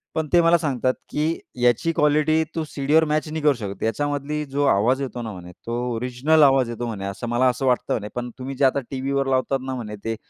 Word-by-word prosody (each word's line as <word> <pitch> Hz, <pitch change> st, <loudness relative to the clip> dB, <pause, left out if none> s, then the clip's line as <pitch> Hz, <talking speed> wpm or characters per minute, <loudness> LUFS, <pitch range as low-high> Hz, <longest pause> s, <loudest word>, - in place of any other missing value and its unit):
पण 160 Hz, -1 st, -1 dB
ते 175 Hz, -, +7 dB
मला 170 Hz, +1 st, +5 dB
सांगतात, 130 Hz, -5 st, 0 dB, 0.2 s
की 155 Hz, +2 st, -1 dB, 0.2 s
"याची 125 Hz, +7 st, +3 dB
क्वालिटी 155 Hz, +2 st, +3 dB
तू 165 Hz, -, -1 dB
सीडीवर 150 Hz, +3 st, +2 dB
मॅच 155 Hz, +1 st, 0 dB
नाही 155 Hz, +1 st, -4 dB
करू 150 Hz, -1 st, +5 dB
शकत. 100 Hz, -6 st, -6 dB
याच्यामधला 145 Hz, +5 st, -1 dB
जो 145 Hz, +1 st, +1 dB
आवाज 125 Hz, +7 st, +2 dB
येतो 125 Hz, -2 st, -4 dB
ना," 115 Hz, -2 st, -5 dB
म्हणे 90 Hz, -1 st, -10 dB
तो 115 Hz, +1 st, -2 dB, 0.2 s
"ओरिजिनल 125 Hz, +7 st, +2 dB
आवाज 135 Hz, -3 st, +4 dB
येतो." 120 Hz, +1 st, -4 dB
म्हणे, 100 Hz, -4 st, -5 dB
"असं 100 Hz, +4 st, -5 dB
मला 120 Hz, +2 st, +2 dB
असं 130 Hz, +2 st, -2 dB
वाटतं" 125 Hz, -2 st, +1 dB
म्हणे. 105 Hz, -2 st, -3 dB
"पण 125 Hz, 0 st, -3 dB
तुम्ही 135 Hz, +1 st, -5 dB
जे 135 Hz, -, +2 dB
आता 135 Hz, +1 st, +3 dB
टीव्हीवर 135 Hz, +1 st, -1 dB
लावतात 135 Hz, +1 st, +1 dB
ना." 130 Hz, 0 st, -3 dB
म्हणे 110 Hz, -4 st, -6 dB
"ते 115 Hz, 0 st, -1 dB
135 Hz, 220 wpm, -23 LUFS, 120-150 Hz, 0.2 s, ते